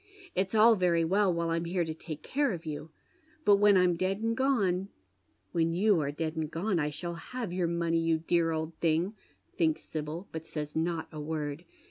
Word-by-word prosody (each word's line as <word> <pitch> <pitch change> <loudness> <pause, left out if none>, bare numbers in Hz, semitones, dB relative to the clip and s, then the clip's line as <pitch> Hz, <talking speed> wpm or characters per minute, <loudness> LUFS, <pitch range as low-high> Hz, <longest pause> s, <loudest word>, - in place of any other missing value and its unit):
It's 190 +3 -1
all 225 +1 +7
very 175 -4 +2
well 195 +3 +3
while 170 -1 -1
I'm 165 +1 0
here 175 0 0
to 160 - -3
take 155 -1 -8
oare 280 -5 +3
of 170 -2 -7
you, 150 0 -5 0.6
but 205 -1 +7
when 205 -1 +6
I'm 180 -1 +4
dead 185 +3 0
and 225 0 0
gone 205 -9 +1 0.2
" 95 0 -45
" - - -43
When 165 -1 +1
you 195 +1 +3
are 145 -2 -1
dead 155 +2 -3
and 160 -1 -2
gone 180 +3 -1
I 150 -1 0
shall 170 +4 -4
have 215 +4 -5
your 180 -2 0
money, 170 -1 +1
yon 165 -1 +1
dear 170 -1 +2
old 160 0 -2
thing," 170 +4 +1 0.4
thinks 160 -2 +1
Sibyl, 155 +5 -5
but 160 0 -6
says 150 -2 -5
not 165 0 -1
a 155 - -7
word. 150 +1 -4
170 Hz, 210 wpm, -30 LUFS, 160-190 Hz, 0.6 s, all